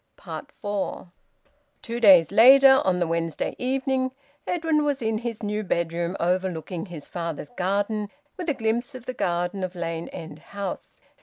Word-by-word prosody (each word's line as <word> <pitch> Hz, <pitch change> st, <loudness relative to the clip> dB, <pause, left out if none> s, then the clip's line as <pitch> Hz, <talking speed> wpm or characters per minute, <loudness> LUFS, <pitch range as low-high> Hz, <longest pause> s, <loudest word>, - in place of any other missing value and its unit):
FOUR. 205 Hz, -3 st, -5 dB, 0.7 s
Two 235 Hz, 0 st, -4 dB
days 190 Hz, -7 st, +7 dB
later, 265 Hz, +5 st, +8 dB
on 185 Hz, -1 st, +1 dB
the 175 Hz, -, +2 dB
Wednesday 165 Hz, -1 st, -2 dB
evening, 260 Hz, 0 st, 0 dB, 0.4 s
Edwin 325 Hz, -3 st, +1 dB
was 290 Hz, -2 st, 0 dB
in 220 Hz, -2 st, -1 dB
his 230 Hz, -2 st, -5 dB
new 210 Hz, +1 st, -1 dB
bedroom, 170 Hz, -1 st, -1 dB
overlooking 180 Hz, 0 st, -1 dB
his 165 Hz, -5 st, -8 dB
father's 165 Hz, -4 st, -5 dB
garden, 205 Hz, +3 st, -1 dB, 0.3 s
with 360 Hz, -3 st, -4 dB
a 295 Hz, -, +1 dB
glimpse 235 Hz, +3 st, -1 dB
of 250 Hz, -2 st, -9 dB
the 255 Hz, -, -4 dB
garden 175 Hz, -2 st, -1 dB
of 185 Hz, 0 st, -4 dB
Lane 165 Hz, -1 st, -4 dB
End 160 Hz, -2 st, -9 dB
House. 200 Hz, +3 st, -6 dB
200 Hz, 150 wpm, -25 LUFS, 175-245 Hz, 0.7 s, later